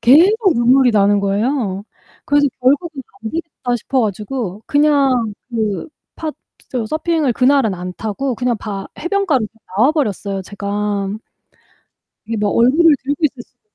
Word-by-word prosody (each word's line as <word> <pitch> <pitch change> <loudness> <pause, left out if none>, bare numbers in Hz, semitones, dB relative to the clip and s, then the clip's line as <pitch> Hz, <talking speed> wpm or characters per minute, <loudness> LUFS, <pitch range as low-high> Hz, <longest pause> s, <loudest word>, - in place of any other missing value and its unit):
계속 370 - +5
눈물이 250 +2 +4
나는거에요. 205 +1 +1 0.4
그래서 290 0 +3
결국은 280 +2 +1 0.2
안되겠다 255 -2 -3
싶어 260 +3 -1
가지고 210 0 -3
그냥 275 -7 +2 0.2
그 220 - -2 0.3
파 310 -1 -4 0.6
서핑을 310 -4 0
그날은 260 -4 +3
안 180 +1 -6
타고 235 +4 -2
그냥 245 -1 0
바 200 -2 -6
해변가로 345 - +1 0.3
나와버렸어요 210 - +1
제가. 205 0 -3 1.2
이게 230 - -3
뭐 205 -1 0
얼굴을 295 +9 +5
들고 285 +4 -2
있을 260 -4 0
수가 - - -29
250 Hz, 285 characters per minute, -18 LUFS, 210-290 Hz, 1.2 s, 계속